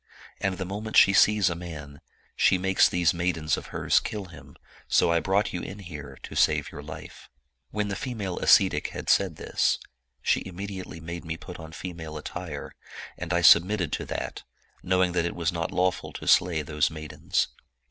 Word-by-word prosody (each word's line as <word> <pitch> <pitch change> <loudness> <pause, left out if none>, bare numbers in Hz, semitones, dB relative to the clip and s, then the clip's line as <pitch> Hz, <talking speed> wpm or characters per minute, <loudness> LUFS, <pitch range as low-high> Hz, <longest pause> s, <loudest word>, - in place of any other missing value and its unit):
And 95 -2 -1
the 95 - -3
moment 105 +4 -3
she 100 - +7
sees 105 -1 +5
a 85 - +1
man, 80 -5 -8 0.3
she 95 - +4
makes 95 +1 +3
these 85 -3 +2
maidens 85 -3 0
of - - -8
hers - - +2
kill 105 -2 -5
him: 85 -2 -14 0.3
so - - +3
I 85 - +3
brought 95 +6 +1
you 90 - -3
in 95 - -7
here 75 -8 -9
to - - -8
save - - +2
your 75 - -8
life.' 75 - -10 0.2
" 65 -1 -52
When 105 0 -2
the 100 - -2
female 105 -6 -4
ascetic - - +4
had - - -6
said 95 -5 +2
this, - - +1 0.5
she - - +2
immediately 95 -2 -7
made 85 +2 -6
me 80 0 -4
put 90 +1 -10
on 80 0 -9
female 80 -3 -7
attire; 75 -1 -6 0.4
and 90 -1 -6
I 85 0 +2
submitted 85 +1 +5
to - - -2
that, - - -5 0.4
knowing 90 0 +2
that 85 -1 0
it 85 - -3
was 85 -2 0
not 85 -1 -2
lawful 90 0 0
to - - -8
slay 85 -4 +4
those 75 0 +1
maidens. 80 -1 -2
85 Hz, 190 wpm, -27 LUFS, 80-95 Hz, 0.5 s, she